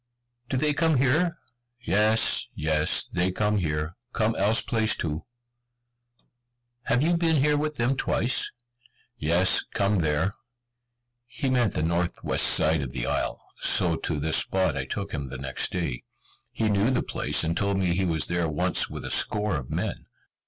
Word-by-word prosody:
"Do 130 - -1
they 150 +2 +1
come 160 -1 +2
here?" 155 +7 +1 0.4
"Yes, 110 0 +3
yes, 75 0 +2
they 90 +1 +1
come 105 +2 0
here, 80 -2 -2 0.2
come 110 0 +1
else 110 +3 +2
place 110 -2 +1
too." 80 -1 -4 1.6
"Have 125 +4 +1
you 170 +2 +2
been 165 -1 +1
here 150 +1 +2
with 150 +1 -2
them 125 +2 0
twice?" 125 -1 +1 0.7
"Yes, 85 +4 +3
come 100 +1 +1
there." 80 +3 0 0.9
He 135 +1 -3
meant 120 -6 +1
the 80 - -1
North 85 +1 -1
West - - +3
side 80 -1 +3
of 65 -2 -6
the - - -3
isle, - - -2 0.2
so 85 -2 +2
to 75 -3 -2
this 80 +2 +1
spot 95 -1 +1
I 65 -2 -3
took 100 +9 -5
him 70 -3 -5
the 65 - -6
next 65 0 -2
day. 80 -10 -3 0.5
He 110 - -1
knew 105 +2 +2
the 130 -2 0
place, - - 0
and 80 +1 -1
told 100 0 0
me 90 -3 +1
he 95 +2 0
was 80 -4 0
there 85 -1 -1
once 75 - +1
with - - -7
a - - -3
score 105 -3 +1
of 70 -4 -5
men. - - -4
95 Hz, 170 wpm, -26 LUFS, 80-120 Hz, 1.6 s, Yes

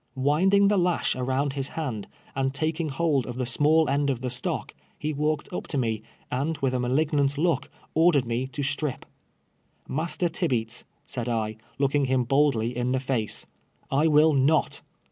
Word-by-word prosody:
AVindingthe 190 +8 +4
lash 175 -1 +1
around 130 +2 0
his 135 -1 -3
hand, 125 -10 -3 0.3
and 135 0 0
taking 160 +1 -1
hold 140 -2 +1
of 125 - -5
the 125 0 -2
small 150 +5 +3
end 140 +1 +1
of 125 -3 -1
the 125 -1 -3
stock, 125 0 -3 0.2
he 155 +1 -2
walked 150 +3 -1
up - - -4
to 145 - -2
me, 110 -4 0 0.3
and 145 +5 -1
with 135 -2 0
a - - +1
nuUignant 140 +2 +1
look, 160 -4 +1 0.2
ordered 160 -5 +4
me 120 +2 -1
to 140 +2 -4
strip. 145 0 -1 0.5
" - - -43 0.3
Master 170 +4 -1
Tibeats, 125 -9 -1 0.2
said 120 -1 -4
I, 110 -2 -1 0.2
looking 140 0 +2
him 130 -1 +2
boldly 125 -3 +2
in 125 +1 0
the 130 - +1
face, 130 -5 -2 0.2
" - - -36
I 160 - +4
will 155 0 +5
not.'' 145 +3 +2
140 Hz, 175 wpm, -26 LUFS, 125-155 Hz, 0.5 s, will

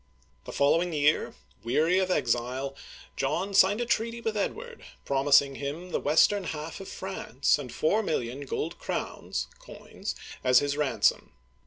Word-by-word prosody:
The - - -7
following 165 +5 +2
year, 150 0 +2 0.3
weary 160 +10 +2
of 190 -1 0
exile, 130 -2 -1 0.4
John 170 +9 -1
signed 195 +3 +5
a - - 0
treaty 230 0 -1
with 225 -2 -2
Edward, 470 - -4 0.2
promising 140 0 +3
him 155 +6 -5
the - - 0
western 180 +7 +3
half 160 0 -5
of 190 - -9
France 150 -9 -1
and 130 -4 -7
four 205 +8 +1
million 140 - -3
gold 165 +6 -3
crowns - - -3
(coins) - - -7 0.3
as 125 -1 +5
his 145 +1 +2
ransom. 135 -8 +1
150 Hz, 145 wpm, -28 LUFS, 140-190 Hz, 0.4 s, signed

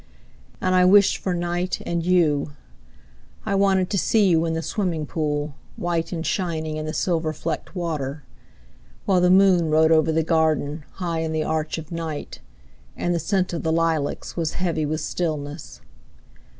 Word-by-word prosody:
And 185 - 0
I 185 0 +5
wished 200 +2 +5
for 185 -2 -2
night 175 +1 -2
and 170 -1 -1
you. 160 -5 +2 0.9
I - - -1
wanted 195 -2 +2
to 200 - +1
see 215 +1 +3
you 165 -2 +3
in 160 - -1
the 165 - -2
swimming 170 -7 -2
pool, 150 -1 -2 0.2
White 170 -1 -2
and 165 -2 -3
shining 160 -4 -2
in 155 0 -4
the - - -2
silver 165 -2 0
flecked 155 +4 -5
water. 150 -5 -3 0.8
While 185 -3 +3
the 180 - +4
moon 185 -3 +5
rode 160 +1 +4
over 160 0 +4
the 160 0 +1
garden, 155 -2 0
High 170 -3 -3
in 160 -1 -2
the 155 0 0
arch 155 0 -2
of 160 0 -8
night, 165 -3 -5 0.6
And 175 - 0
the 170 - 0
scent 190 -1 0
of 170 - -2
the 160 - 0
lilacs 160 -3 -1
was 165 -3 -1
heavy 165 -4 -1
with 155 +1 -2
stillness. 155 -3 -4
165 Hz, 170 wpm, -23 LUFS, 155-180 Hz, 0.9 s, I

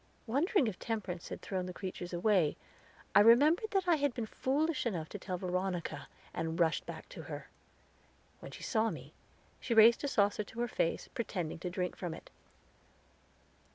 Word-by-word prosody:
Wondering 285 - +2
if 215 -5 -3
Temperance 195 -6 -4
had - - -7
thrown 185 -2 -2
the 180 - -7
creatures 185 -2 -5
away, 175 -3 +2 0.6
I - - +8
remembered 290 - +6
that 390 -3 0
I 340 -2 +5
had 285 -3 0
been 235 - -2
foolish 285 +5 0
enough 170 -8 -2
to 205 - -7
tell 185 -1 -4
Veronica, 180 -1 -2 0.3
and 165 +1 -3
rushed 165 -2 +2
back - - -7
to - - -8
her. - - -7 0.9
When - - -9
she - - -10
saw 225 -1 +1
me, - - -8 0.5
she 235 - -1
raised 225 +3 +7
a - - +1
saucer 205 -4 +2
to 225 - -11
her 240 - +1
face, 165 - -1
pretending 180 -9 -3
to 180 - -3
drink 180 0 -2
from 175 -3 -4
it. - - -14
210 Hz, 175 wpm, -33 LUFS, 180-240 Hz, 0.9 s, I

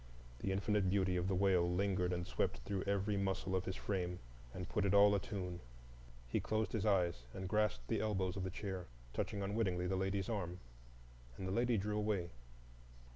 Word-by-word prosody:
The 95 - -1
infinite 100 0 +2
beauty 95 -1 +2
of 90 0 +1
the 95 - +1
wail 90 -2 +4
lingered 90 -1 +1
and 90 0 -1
swept 65 - 0
through 100 -1 -2
every 100 +1 +1
muscle 95 -1 0
of 95 - 0
his 95 - -2
frame, 90 -3 -2 0.3
and 90 +5 -5
put 105 - 0
it 100 0 +3
all 100 0 +8
a 100 - +3
tune. 90 -3 -4 0.7
He - - 0
closed 110 0 0
his 110 -2 0
eyes 85 -10 +2
and 95 0 -4
grasped 105 - +1
the 105 - 0
elbows 95 -4 0
of 95 - -2
the 95 - -1
chair, 95 -1 -4 0.3
touching 100 -1 -2
unwittingly 95 -3 0
the 95 +1 0
lady's 95 +2 0
arm. 90 -6 -2 0.8
And 95 - -4
the - - -1
lady 120 +3 +2
drew 105 +2 -1
away. 100 -5 0
95 Hz, 190 wpm, -38 LUFS, 90-100 Hz, 0.8 s, all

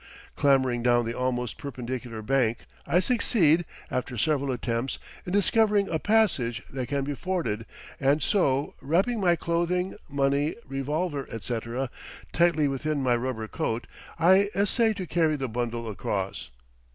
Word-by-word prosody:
Clambering 130 -4 +3
down 120 0 +3
the 115 - -2
almost 125 -2 -2
perpendicular 125 -4 -5
bank 120 -2 +1 0.2
I 160 +5 +4
succeed, 180 - +3 0.3
after 125 -1 -2
several 140 +3 +1
attempts, 120 +1 -2 0.3
in - - -3
discovering 205 0 +3
a 160 - 0
passage 170 - +2
that 130 -2 -3
can 140 +1 -1
be 145 +1 -2
forded, 150 - -2 0.3
and 140 +2 +2
so, 140 -9 +1
wrapping 190 - +1
my 175 -2 +4
clothing, 175 +2 -1
money, 140 +2 +1
revolver, 145 +2 -2
etc. 120 +3 -3 0.4
tightly 165 -3 +3
within 140 +1 -1
my 125 -2 +3
rubber 120 -2 -3
coat, 115 +2 -2 0.3
I 190 +5 +5
essay 220 +3 +2
to 190 -3 -5
carry 160 -2 +2
the 135 -2 -2
bundle 120 0 -3
across. 100 - -3
140 Hz, 140 wpm, -27 LUFS, 120-175 Hz, 0.4 s, I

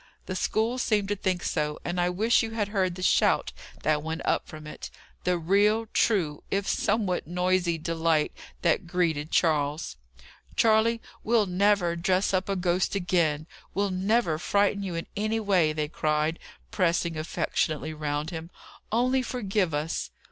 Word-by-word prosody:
The 185 - -4
school 225 +6 0
seemed 210 -4 +1
to 205 - +1
think 185 -3 -1
so; 150 0 -1
and 175 +1 -1
I 175 - +2
wish 215 +6 +3
you 225 - -2
had 210 -3 -1
heard 190 -4 0
the 185 - -6
shout - - +3 0.3
that 150 0 +2
went 160 +2 -4
up - - 0
from 155 -1 -10
it 150 - -8 0.4
the 180 0 +2
real, 205 +6 +3
true, 165 -10 +1
if 195 0 -1
somewhat 200 -7 0
noisy 180 -1 +1
delight, 160 -1 +1 0.3
that 170 0 +2
greeted 165 -4 0
Charles. 145 - +1 0.6
"Charley, 225 +1 +3 0.2
we'll 225 -1 +3
never 185 -2 +2
dress 185 +3 +1
up 190 +1 0
a 195 - +1
ghost 180 +1 0
again! 170 -5 +1 0.3
We'll 200 0 +1
never 185 -3 +1
frighten 200 +2 +1
you 185 -3 -4
in 165 - -3
any 215 +2 0
way!" 190 -7 +3
they 155 -1 -2
cried, 155 +1 0 0.3
pressing 170 -2 +1
affectionately 155 -1 -1
round 150 +1 -3
him. 165 0 -6 0.4
"Only 255 +4 +2
forgive 210 -7 -1
us!" 150 +2 -2
180 Hz, 155 wpm, -27 LUFS, 160-205 Hz, 0.6 s, wish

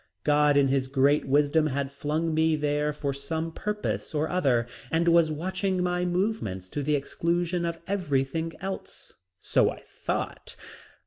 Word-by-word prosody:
God 150 -1 +4
in 140 -1 +4
His 135 -1 +1
great 140 +2 +3
wisdom 145 +3 +3
had 140 -1 -2
flung 155 +3 -1
me 160 0 +3
there 150 0 0
for 145 -2 -3
some 160 +4 -3
purpose 210 -3 -3
or 150 +1 +1
other 135 -10 +2 0.2
and 165 +1 +1
was 170 -2 +5
watching 185 +3 -1
my 180 0 0
movements 175 - -1
to 145 - -3
the 150 +1 +1
exclusion 170 +4 -1
of 170 0 -2
everything 165 -4 -1
else, 190 +1 -6 0.3
so - - +3
I - - -7
thought. - - -4
155 Hz, 150 wpm, -27 LUFS, 140-175 Hz, 0.3 s, was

